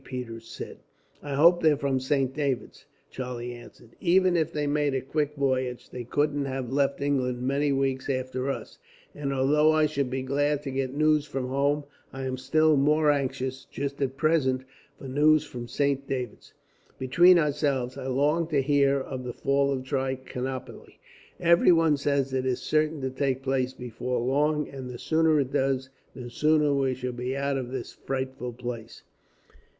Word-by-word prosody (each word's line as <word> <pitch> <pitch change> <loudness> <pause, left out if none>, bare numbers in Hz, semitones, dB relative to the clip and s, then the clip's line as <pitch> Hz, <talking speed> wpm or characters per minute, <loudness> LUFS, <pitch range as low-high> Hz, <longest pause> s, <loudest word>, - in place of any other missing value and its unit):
Peters 115 -4 -7
said. - - -8 0.4
"I 145 -1 -4
hope 170 +4 +6
they're 155 -3 +4
from 140 -2 0
Saint 130 0 0
David's," 140 -4 -3 0.2
Charlie 125 -2 -5
answered. 120 -1 -14
"Even 185 0 +3
if 160 -1 +1
they 150 -2 -2
made 145 -1 +1
a 130 - 0
quick 150 +2 -2
voyage, 130 -3 -1
they 125 - -6
couldn't 145 +3 0
have 130 -2 -4
left 140 0 +1
England 130 -3 0
many 140 +2 +1
weeks 135 0 -1
after 130 0 -2
us; 135 - -5 0.3
and 140 -1 -3
although 145 +3 +3
I 155 0 +4
should 140 -3 -1
be 130 +1 -3
glad 145 +2 0
to 135 - -4
get 135 0 -2
news 155 0 +3
from 135 -3 -3
home, 140 +2 +1 0.3
I 135 0 -6
am 130 -1 -2
still 155 +4 +3
more 150 +2 +4
anxious, 130 -2 -2
just 140 0 -5
at 135 -1 -1
present, 135 -4 +2 0.3
for 135 - -9
news 150 +3 +4
from 120 -5 -8
Saint 140 +2 0
David's. 125 -4 -5 0.4
Between 175 +8 +5
ourselves, 140 -5 0
I 135 -1 -6
long 145 +5 +1
to 150 -3 +1
hear 140 -1 +3
of 130 -1 -5
the 125 -1 -5
fall 140 0 +1
of 130 -2 -2
Trichinopoli. 130 -1 -4 0.4
Everyone 170 -2 +5
says 140 -1 0
it 130 0 0
is 125 -1 0
certain 155 -1 0
to 130 0 -2
take 135 0 -1
place 130 -1 0
before 125 0 -4
long, 150 +4 +1
and 130 -2 -8
the 125 - -7
sooner 160 +2 +2
it 135 -2 -2
does, 130 -1 0 0.2
the 120 -2 -8
sooner 150 +2 +3
we 135 -2 +1
shall 125 0 -4
be 125 +2 -3
out 140 0 0
of 125 -2 -5
this 130 -1 -5
frightful 130 -2 -4
place." 120 -2 -7
135 Hz, 175 wpm, -27 LUFS, 130-145 Hz, 0.4 s, hope